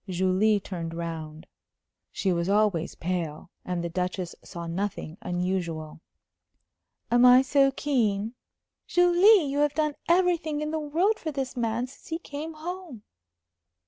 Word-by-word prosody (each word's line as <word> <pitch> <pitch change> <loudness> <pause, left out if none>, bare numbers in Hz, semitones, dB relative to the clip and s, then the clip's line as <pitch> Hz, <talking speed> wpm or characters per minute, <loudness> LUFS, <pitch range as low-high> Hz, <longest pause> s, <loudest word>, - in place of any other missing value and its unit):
Julie 190 +4 +2
turned 170 -4 -6
round. 165 -1 -6 0.7
She 190 -2 0
was 170 +1 -1
always 200 -5 +1
pale, 170 -2 -4
and 180 -1 -3
the 170 - -2
Duchess 180 0 -3
saw 170 -1 -7
nothing 170 -2 -4
unusual. 175 -5 -3 1.1
"Am 240 +1 +5
I 250 +1 +8
so 275 0 +4
keen?" 230 -7 0 0.5
"Julie, 355 +2 +5
you 280 +1 -2
have 295 -1 +2
done 305 -1 +1 0.2
everything 340 -4 +2
in 300 0 -2
the 315 - -1
world 340 +9 +1
for 315 - -4
this 270 -2 -4
man 235 0 -1
since 255 - -16
he 325 - -2
came 315 -1 -7
home." 330 - -7
220 Hz, 140 wpm, -27 LUFS, -, 1.1 s, I